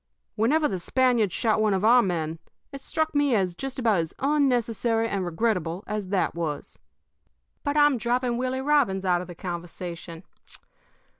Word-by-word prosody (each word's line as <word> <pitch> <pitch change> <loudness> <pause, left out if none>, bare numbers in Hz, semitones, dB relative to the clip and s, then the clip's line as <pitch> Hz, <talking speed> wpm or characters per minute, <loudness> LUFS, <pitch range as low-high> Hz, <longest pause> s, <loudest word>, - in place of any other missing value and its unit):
Whenever 295 +8 +2
the 190 - -3
Spaniards 245 -1 +2
shot 220 +2 +1
one 210 -2 +2
of 190 +2 0
our 245 +2 +7
men, 165 -5 -2 0.3
it 275 -1 -8
struck 315 +2 -1
me 290 -4 +2
as 185 -4 +1
just 270 +9 -6
about 225 -7 +2
as 165 -1 -4
unnecessary 240 -5 +1
and 200 -3 -2
regrettable 180 -1 -1
as 210 -2 -4
that 190 0 0
was. 160 -4 -4 0.8
"But 285 0 -1
I'm 290 -4 +4
dropping 245 +1 0
Willie 255 +1 -2
Robbins 265 -10 +2
out 175 -1 +2
of 180 - -8
the 175 - -9
conversation. 175 -1 -7
220 Hz, 160 wpm, -25 LUFS, 180-255 Hz, 0.8 s, our